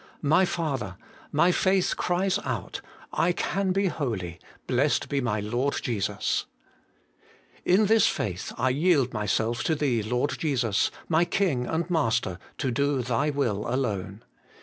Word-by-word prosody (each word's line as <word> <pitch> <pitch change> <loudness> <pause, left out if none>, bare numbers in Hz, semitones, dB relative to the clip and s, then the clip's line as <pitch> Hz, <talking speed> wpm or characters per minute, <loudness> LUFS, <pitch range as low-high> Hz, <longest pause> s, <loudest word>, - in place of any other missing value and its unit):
My 160 +6 +4
Father! 135 - -3 0.3
my 170 +5 +4
faith 190 +1 +2
cries 185 +2 0
out: - - -4 0.3
I 175 +2 +2
can 190 +2 -1
be 195 +2 +1
holy, 110 - -3 0.3
blessed 135 +3 +1
be 140 -1 0
my 110 -4 0
Lord 120 +7 -1
Jesus! 105 -3 -1 1.2
In 195 +4 +4
this 220 0 +5
faith 95 -3 -2
I 130 +2 +2
yield 145 -3 +2
myself 110 +3 0
to 160 - +2
Thee, 135 -7 +1
Lord 125 +6 -1
Jesus, 125 -10 +1 0.2
my 165 +1 +3
King 170 -9 0
and 165 +1 -1
Master, 115 - +1 0.2
to 130 - -1
do 140 0 +1
Thy 125 +5 0
will 120 -8 -1
alone. 105 -5 -2
135 Hz, 140 wpm, -26 LUFS, 115-165 Hz, 1.2 s, this